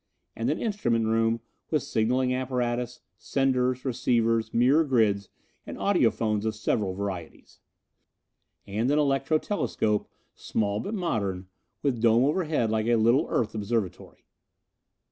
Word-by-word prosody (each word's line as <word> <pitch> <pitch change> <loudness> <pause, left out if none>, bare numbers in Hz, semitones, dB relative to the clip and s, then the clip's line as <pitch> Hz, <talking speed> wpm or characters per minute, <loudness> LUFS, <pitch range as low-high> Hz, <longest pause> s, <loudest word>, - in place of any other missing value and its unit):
And - - -1
an - - 0
instrument 120 - 0
room 115 +1 +1 0.3
with 155 -4 +1
signaling 125 +3 +1
apparatus, 125 -1 -2 0.2
senders, 130 -1 0
receivers, 115 -3 +1
mirror 130 +7 +4
grids 110 -8 +1 0.3
and - - -8
audiphones 110 - +1
of 110 0 -1
several 105 -3 -1
varieties; 95 -5 -6 1.1
and 110 +5 -1
an 145 - +3
electro 140 +1 +2
telescope, 110 - -1 0.2
small 105 -1 -2
but 205 - -4
modern, 100 - -2 0.3
with 130 -6 0
dome 115 +1 +5
overhead 150 -6 +1
like 110 0 0
a 120 - +4
little 115 +7 +3
Earth 110 -2 0
observatory. 110 -3 -3
115 Hz, 125 wpm, -27 LUFS, 110-130 Hz, 1.1 s, dome